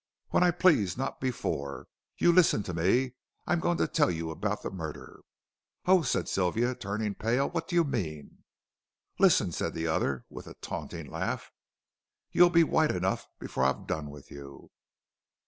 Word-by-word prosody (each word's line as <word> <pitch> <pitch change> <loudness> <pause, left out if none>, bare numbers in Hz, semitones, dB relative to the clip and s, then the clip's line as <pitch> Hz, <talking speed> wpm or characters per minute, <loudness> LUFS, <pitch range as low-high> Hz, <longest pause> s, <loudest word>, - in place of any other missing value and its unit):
"When - - +2
I 180 - +5
please, 165 - +3
not 135 +1 -3
before. 70 - -3 0.3
You 175 - +5
listen 170 - +4
to 90 - -5
me. 115 +10 +2 0.3
I'm 175 - +1
going 175 +1 +1
to - - +1
tell 150 - +2
you 80 -1 -3
about 105 +6 -3
the - - -4
murder 80 -5 -7 0.3
" - - -54
"Oh," 185 0 +5
said 145 - -1
Sylvia, 110 +7 +1
turning 105 -3 -3
pale, 120 +7 0
"what 165 -1 -3
do 175 - -3
you 170 - +5
mean?" 80 - -4 0.8
"Listen," - - +4
said - - -3
the 80 - -2
other, 70 -5 0
with - - -10
a - - -10
taunting - - -6
laugh, - - -4 0.8
"you'll 175 0 +6
be 170 -1 +5
white 155 -1 +2
enough 95 +1 -1
before 65 - -3
I've 65 0 +1
done 75 -2 -3
with 70 -1 -13
you. 70 -1 -11
105 Hz, 170 wpm, -29 LUFS, -, 0.8 s, you'll